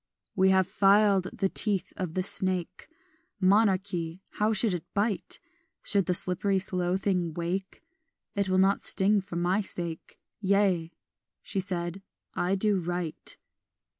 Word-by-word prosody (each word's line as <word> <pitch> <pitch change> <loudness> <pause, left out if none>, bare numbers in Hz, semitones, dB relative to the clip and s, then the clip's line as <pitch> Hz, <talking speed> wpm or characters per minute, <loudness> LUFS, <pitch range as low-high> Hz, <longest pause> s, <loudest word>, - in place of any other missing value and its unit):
"We 190 0 +4
have 190 -1 +3
filed 200 -1 +4
the 195 - -1
teeth 200 -1 0
of 180 -4 -4
the 185 - 0
snake 185 -2 0 0.5
Monarchy, 190 -3 +1 0.2
how 210 +1 +2
should 215 -1 +3
it 175 -3 -6
bite? 205 0 -1 0.4
Should 200 -3 0
the 180 - +1
slippery 190 +3 +2
slow 185 -2 0
thing 180 -5 -1
wake, 180 +3 -4 0.5
It 200 -1 -1
will 185 - +2
not 195 +1 +3
sting 200 +1 +2
for 190 -2 -9
my 180 +4 +1
sake; 170 -4 -6 0.2
Yea," 195 -4 +1 0.5
she 195 - -3
said, 180 -1 -3 0.3
"I 180 +2 0
do 200 0 +2
right." 175 -2 -4
190 Hz, 135 wpm, -28 LUFS, 180-200 Hz, 0.5 s, We